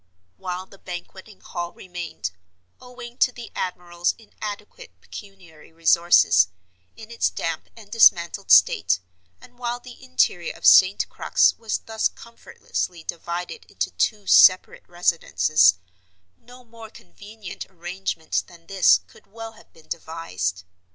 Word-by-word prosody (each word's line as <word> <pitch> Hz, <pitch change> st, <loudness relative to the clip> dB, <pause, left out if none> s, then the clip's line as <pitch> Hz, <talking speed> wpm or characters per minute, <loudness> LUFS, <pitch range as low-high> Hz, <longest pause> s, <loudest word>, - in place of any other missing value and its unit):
While 185 Hz, 0 st, -5 dB
the 195 Hz, 0 st, -18 dB
Banqueting 190 Hz, +3 st, -10 dB
Hall 175 Hz, -1 st, -6 dB
remained—owing 175 Hz, -, -10 dB
to 255 Hz, -, +4 dB
the 240 Hz, -1 st, -10 dB
admiral's 175 Hz, -1 st, -2 dB
inadequate 225 Hz, -, -10 dB
pecuniary 185 Hz, -8 st, -13 dB
resources—in 95 Hz, -, +2 dB
its 235 Hz, -, 0 dB
damp -, -, -4 dB
and 210 Hz, -2 st, -15 dB
dismantled 170 Hz, -, +4 dB
state, 90 Hz, 0 st, +5 dB, 0.4 s
and 245 Hz, 0 st, -19 dB
while 240 Hz, 0 st, -3 dB
the 250 Hz, +1 st, -14 dB
interior 225 Hz, -9 st, 0 dB
of -, -, -9 dB
St. 185 Hz, +1 st, +6 dB
Crux -, -, +2 dB
was 225 Hz, -2 st, -3 dB
thus 220 Hz, -1 st, 0 dB
comfortlessly 185 Hz, -6 st, -7 dB
divided 175 Hz, -, -6 dB
into -, -, -4 dB
two 210 Hz, -3 st, -1 dB
separate 185 Hz, -1 st, +5 dB
residences, 160 Hz, -, +3 dB, 0.6 s
no 250 Hz, -, -17 dB
more 230 Hz, -1 st, -13 dB
convenient 210 Hz, -2 st, -11 dB
arrangement 175 Hz, -2 st, -4 dB
than 170 Hz, -2 st, -18 dB
this 170 Hz, -, +4 dB
could 90 Hz, -, -21 dB
well 225 Hz, +2 st, -9 dB
have 225 Hz, -, -20 dB
been 160 Hz, -, -21 dB
devised. 95 Hz, -, -4 dB
180 Hz, 120 wpm, -23 LUFS, 160-225 Hz, 0.6 s, St